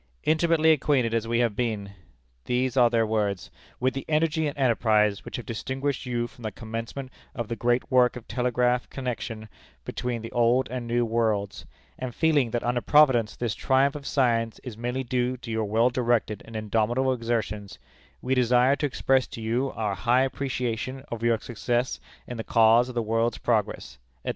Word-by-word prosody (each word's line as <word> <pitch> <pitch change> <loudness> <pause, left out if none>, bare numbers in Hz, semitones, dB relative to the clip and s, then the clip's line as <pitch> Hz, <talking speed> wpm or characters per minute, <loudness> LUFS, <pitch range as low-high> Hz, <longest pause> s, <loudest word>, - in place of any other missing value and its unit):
"Intimately 160 0 +3
acquainted 135 -6 +2
as 115 -1 0
we 115 0 +1
have 115 -4 +1
been" 105 -4 -2 0.5
these 125 0 0
are 125 -2 +5
their 115 -1 +2
words 105 -3 -1 0.3
"with 130 +1 +1
the 135 - -4
energy 160 0 +1
and 145 - -5
enterprise 110 -5 +2
which - - -7
have 120 - -6
distinguished 130 +3 -3
you 120 -1 -1
from 120 +1 -13
the 110 -1 -4
commencement 115 +5 -6 0.2
of 120 -3 -3
the 115 - -3
great 120 +1 0
work 125 -1 +4
of 125 - -9
telegraph 125 0 0
connection 115 -4 -5 0.4
between 120 -2 -3
the 115 - -7
Old 120 +2 +2
and 125 -2 -4
the - - -2
New 120 0 +3
Worlds; 110 -3 -1 0.3
and 130 -2 -5
feeling 150 -6 +2
that 120 +1 -2
under 120 0 0
Providence 125 -9 +4
this 120 -4 -2
triumph 135 +1 +2
of 145 -2 -7
science 115 -4 +1
is 125 -4 -7
mainly 120 +3 -3
due 125 0 -1
to 120 -1 -8
your 110 -1 0
well 115 +4 +2
directed 120 -3 0
and 115 - -11
indomitable 115 +5 +1
exertions, 110 -4 -3 0.5
we 130 - 0
desire 125 +1 +4
to 145 +1 -1
express 130 -1 +1
to - - -9
you 120 +5 -1
our 105 -3 -1
high 120 +6 +2
appreciation 130 -1 -2
of 115 -1 -5
your 115 -1 +2
success 120 +2 -2 0.3
in 120 - -7
the 110 - -4
cause 115 +3 +4
of 125 - -8
the 120 - 0
world's 115 +1 0
progress," 105 - -1 0.3
etc. - - -2
120 Hz, 185 wpm, -26 LUFS, 115-130 Hz, 0.5 s, are